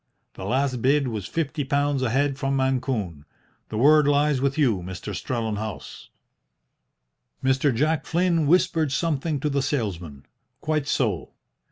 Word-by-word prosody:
The 95 - -8
last 130 +2 0
bid 140 +1 +2
was 105 -5 -4
fifty 150 -2 -2
pounds 140 0 0
a 130 - +1
head 135 +2 0
from 135 0 0
Mancune. 125 - -1 0.5
The 110 - -4
word 150 +4 +5
lies 145 -1 +2
with 140 +1 0
you, 120 -11 +2
Mr. 95 +3 -6
Strellenhaus." 110 - -4 1.3
Mr. 135 +2 +2
Jack 150 +5 0
Flynn 170 -3 +1
whispered 160 -3 +2
something 155 -1 -1
to 150 - 0
the 140 -1 0
salesman. 90 - -3 0.3
"Quite 155 -2 -1
so! 110 - -1
135 Hz, 140 wpm, -24 LUFS, 110-145 Hz, 1.3 s, word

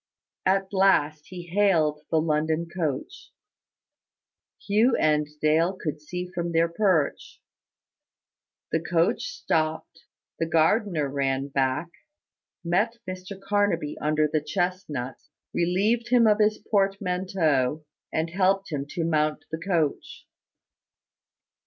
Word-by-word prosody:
At 195 +1 +1
last 155 -6 +2
he 180 -1 -8
hailed 170 -5 +2
the 160 - +2
London 155 +1 0
coach. 170 - -4 1.3
Hugh 220 +5 +2
and 150 -1 +2
Dale 160 +4 +3
could 150 -2 -4
see 180 +4 -5
from 175 -2 -4
their 165 +1 +3
perch. 170 -4 0 1.3
The 160 - +2
coach 170 +1 +1
stopped, 160 - -2 0.3
the 165 - 0
gardener 165 0 +2
ran 135 0 -1
back, 135 +4 0 0.7
met 200 +7 +1
Mr 185 +1 -7
Carnaby 195 -6 0
under 155 0 +1
the 150 0 0
chestnuts, 150 -6 -3 0.2
relieved 205 +8 +1
him 245 -2 +5
of 210 -1 +4
his 215 0 +3
portmanteau, 180 - 0 0.3
and 160 +1 -1
helped 195 +1 +1
him 140 -2 -3
to 170 - -3
mount 155 -2 0
the 160 - -3
coach. 165 -5 -2
170 Hz, 110 wpm, -26 LUFS, 155-195 Hz, 1.3 s, him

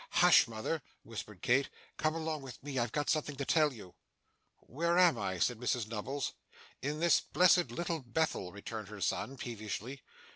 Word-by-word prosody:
'Hush, 175 -6 +6
mother!' 115 +8 -3 0.2
whispered 105 -4 -8
Kit. 135 +3 +3 0.3
'Come 155 0 +1
along 160 -2 -2
with 130 -3 -9
me, 140 -2 -2
I've 120 -2 0
got 145 -1 -1
something 150 -2 0
to 140 0 -3
tell 155 0 +4
you.' 105 -8 -11 0.7
'Where 170 +6 0
am 180 -3 +6
I?' 95 -1 -2
said 115 +6 +1
Mrs 125 -2 0
Nubbles. 125 +6 -3 0.5
'In 150 +3 -2
this 170 +1 +5
blessed 180 -5 +4
Little 165 +6 -2
Bethel,' 125 - -1
returned 105 +2 -7
her 105 0 -9
son, 135 +7 -1
peevishly. 120 +3 -5
135 Hz, 170 wpm, -33 LUFS, 115-155 Hz, 0.7 s, Hush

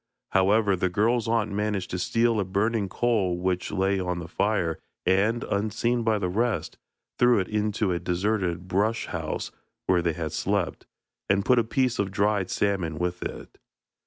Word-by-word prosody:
However, 100 +1 +3
the 95 0 0
girl's 115 +5 +1
aunt 115 -2 +1
managed 105 -2 -2
to 90 - -2
steal 115 +3 +2
a - - +2
burning 100 +2 0
coal 100 -6 +1
which 90 0 -1
lay 95 0 +1
on 90 -1 -2
the 85 -1 -6
fire, 90 -2 0 0.3
and, 100 +6 +2
unseen 110 +4 0
by 110 -1 +2
the 100 - -1
rest, 115 +5 -1 0.4
threw 125 -1 +5
it 95 -3 0
into 105 -1 0
a 85 - 0
deserted 90 -1 -1
brush 105 +5 +1
house - - -4 0.3
where 90 -2 +3
they 85 -1 0
had 80 -1 -4
slept, - - -1 0.4
and 100 0 +2
put 125 -1 +5
a - - +3
piece 125 +2 0
of 100 -1 +1
dried 100 -1 +1
salmon 95 -6 0
with 90 +1 -2
it. - - -7
100 Hz, 170 wpm, -26 LUFS, 90-110 Hz, 0.4 s, threw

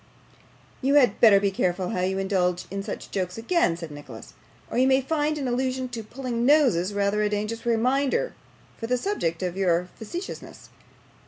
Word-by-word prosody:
'You 275 +2 +2
had 250 -8 +4
better 210 -4 +8
be 200 0 +1
careful 180 -1 -1
how 180 - -2
you 190 +1 0
indulge 185 -2 0
in 195 0 -3
such - - -7
jokes 185 -1 -3
again,' 225 - +1
said 165 -3 -7
Nicholas, 145 0 -11 0.4
'or - - 0
you 260 - +4
may 265 0 +4
find 300 +2 -1
an 275 -3 -2
allusion 255 +1 -1
to 235 -2 -5
pulling 235 +1 -4
noses 245 - +4
rather 200 +1 0
a 210 - +2
dangerous 215 +3 -3
reminder 270 - +1 0.4
for 225 - -5
the 250 +1 +1
subject 190 - -2
of 180 -1 -2
your 180 -2 +1
facetiousness. 345 - -8
225 Hz, 175 wpm, -25 LUFS, 190-260 Hz, 0.4 s, better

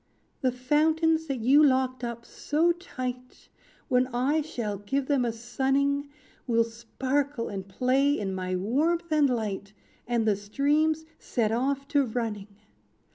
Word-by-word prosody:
"The 260 -3 +2
fountains 315 +5 +2
that 270 -4 -3
you 275 +6 +6
locked 260 -2 +2
up 235 0 -5
so 320 +4 +1
tight, 255 -8 -6 0.4
When 250 0 +3
I 260 +5 +1
shall 225 -9 -4
give 265 +7 -1
them 275 -2 +2
a 235 - 0
sunning, 270 +5 0 0.4
Will 230 -1 +3
sparkle 255 +3 -2
and 195 -1 -6
play 265 +7 +2
in 195 -2 -3
my 185 0 -2
warmth 315 - 0
and 300 -3 +4
light, 210 -4 -3 0.3
And 235 -2 +1
the 210 - +4
streams 295 +10 +1
set 220 -3 -1
off 275 +4 -1
to 285 -2 +3
running. 220 -4 -3
255 Hz, 140 wpm, -27 LUFS, 230-285 Hz, 0.4 s, you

